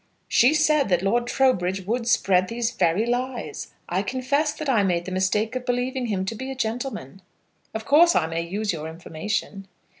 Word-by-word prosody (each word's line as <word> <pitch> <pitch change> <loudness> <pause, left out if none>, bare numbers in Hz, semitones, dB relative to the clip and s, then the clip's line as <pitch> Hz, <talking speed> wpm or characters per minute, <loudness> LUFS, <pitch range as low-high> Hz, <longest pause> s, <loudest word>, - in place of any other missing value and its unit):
"She 260 +6 +4
said 305 -5 +3
that 180 -1 +2
Lord 240 +5 +1
Trowbridge 190 -9 +1
would 230 +3 -2
spread 185 -6 +3
these 230 +1 -2
very 175 +7 +1
lies. 245 - -3 0.2
I 180 +2 0
confess 260 +7 0
that 310 - -6
I 240 -6 +3
made 175 -3 0
the 185 - -6
mistake 210 +5 0
of 255 - -3
believing 250 +1 -1
him 190 -3 -1
to 195 - -3
be 260 +4 -6
a 265 - -5
gentleman. 225 - -4 0.5
Of 220 0 -4
course 335 +5 +5
I 165 - +3
may 165 +1 -2
use 200 +4 -2
your 155 -1 -5
information?" 180 +4 -4
220 Hz, 185 wpm, -24 LUFS, 185-255 Hz, 0.5 s, course